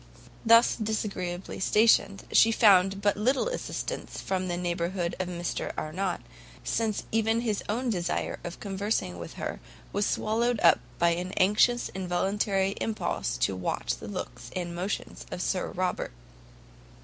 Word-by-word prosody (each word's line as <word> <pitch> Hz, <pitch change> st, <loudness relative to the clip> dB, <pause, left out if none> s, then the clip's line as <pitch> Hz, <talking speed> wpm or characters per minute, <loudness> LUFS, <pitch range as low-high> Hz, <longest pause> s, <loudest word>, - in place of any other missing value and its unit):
Thus 230 Hz, +1 st, +6 dB
disagreeably 200 Hz, -5 st, -3 dB
stationed, 200 Hz, -1 st, +3 dB
she 225 Hz, -, +6 dB
found 195 Hz, -3 st, +5 dB
but 205 Hz, -1 st, +3 dB
little 260 Hz, -, +2 dB
assistance -, -, -4 dB
from 185 Hz, -1 st, -2 dB
the 175 Hz, -1 st, -2 dB
neighbourhood 175 Hz, 0 st, -1 dB
of 185 Hz, -, -1 dB
Mr 175 Hz, -1 st, -3 dB
Arnott, 180 Hz, +4 st, -2 dB, 0.4 s
since 220 Hz, -2 st, -1 dB
even 225 Hz, +1 st, +2 dB
his 215 Hz, -4 st, -1 dB
own 240 Hz, +3 st, 0 dB
desire 175 Hz, -4 st, -2 dB
of 175 Hz, -, -6 dB
conversing 200 Hz, +2 st, -2 dB
with -, -, -7 dB
her, -, -, -5 dB, 0.3 s
was 205 Hz, +1 st, +1 dB
swallowed 230 Hz, +2 st, +1 dB
up 170 Hz, -, +6 dB, 0.2 s
by 170 Hz, -, +4 dB
an 180 Hz, +2 st, -2 dB
anxious 210 Hz, +5 st, +3 dB
and -, -, -9 dB
involuntary 195 Hz, +2 st, +1 dB
impulse 135 Hz, -, -1 dB
to 95 Hz, -, +2 dB
watch 90 Hz, -8 st, -2 dB
the -, -, -9 dB
looks -, -, -6 dB
and 175 Hz, -2 st, -3 dB
motions 185 Hz, +4 st, -4 dB
of -, -, -5 dB
Sir 185 Hz, 0 st, 0 dB
Robert. 180 Hz, 0 st, -2 dB
195 Hz, 145 wpm, -28 LUFS, 180-220 Hz, 0.4 s, Thus